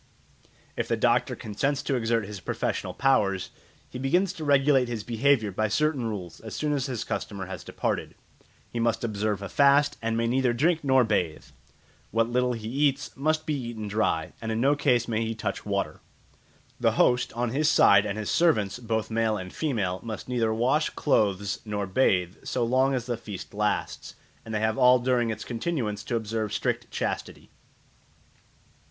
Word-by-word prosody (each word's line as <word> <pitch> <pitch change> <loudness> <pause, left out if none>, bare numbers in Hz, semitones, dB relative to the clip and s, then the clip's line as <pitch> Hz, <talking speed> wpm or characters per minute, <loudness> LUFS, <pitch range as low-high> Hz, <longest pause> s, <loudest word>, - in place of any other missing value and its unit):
If - - -2
the - - 0
doctor - - +2
consents 135 +6 -2
to - - -1
exert 115 -3 +1
his 100 0 -7
professional - - -3
powers, 100 -8 +1 0.4
he 125 - -8
begins 180 +8 +1
to 160 - -7
regulate 140 -2 +4
his 115 -3 -4
behaviour 115 -1 +2
by 110 +3 0
certain 145 +2 0
rules 90 -7 -5
as 110 - -8
soon 150 -1 -1
as 140 -1 -1
his 125 -4 -3
customer 100 -2 -4
has 95 - -7
departed. - - -3 0.6
He 120 - -3
must 115 0 0
observe 105 -2 -1
a - - -4
fast, 140 +5 +4
and 115 0 -1
may 115 - +1
neither 125 +1 +2
drink 160 +6 +1
nor 130 -2 +4
bathe; 90 -8 -1 0.6
what 115 0 +1
little 125 +1 +1
he 110 -2 -6
eats 140 +2 0
must 155 +3 0
be 155 - -1
eaten 120 -6 -4
dry, 100 -6 0
and 110 -1 -3
in 110 - -1
no 140 +4 +3
case 125 -5 +2
may 115 -1 0
he 115 0 -3
touch 110 - -4
water. - - -2 0.8
The - - +2
host, 125 0 +3
on 120 0 -1
his 150 +4 +2
side, 100 -9 +6
and 105 0 -3
his 105 -1 -3
servants, 115 - +2
both 110 -2 -2
male 110 -1 +1
and 90 -1 -7
female, 105 - -1
must 110 -2 -6
neither 120 -3 0
wash 130 +8 +1
clothes 100 -7 0
nor 105 -2 -3
bathe 95 -3 +1
so 125 - -1
long 130 +3 +2
as 125 -2 -2
the 120 -2 -2
feast 105 -5 -8
lasts, 105 0 -2 0.3
and 110 - -9
they 105 - 0
have 110 +4 0
all 125 0 +7
during 125 -1 +1
its 110 -1 -4
continuance 115 -5 -2
to 120 - -2
observe 110 -1 -2
strict - - -1
chastity. - - -4
115 Hz, 180 wpm, -27 LUFS, 105-135 Hz, 0.8 s, all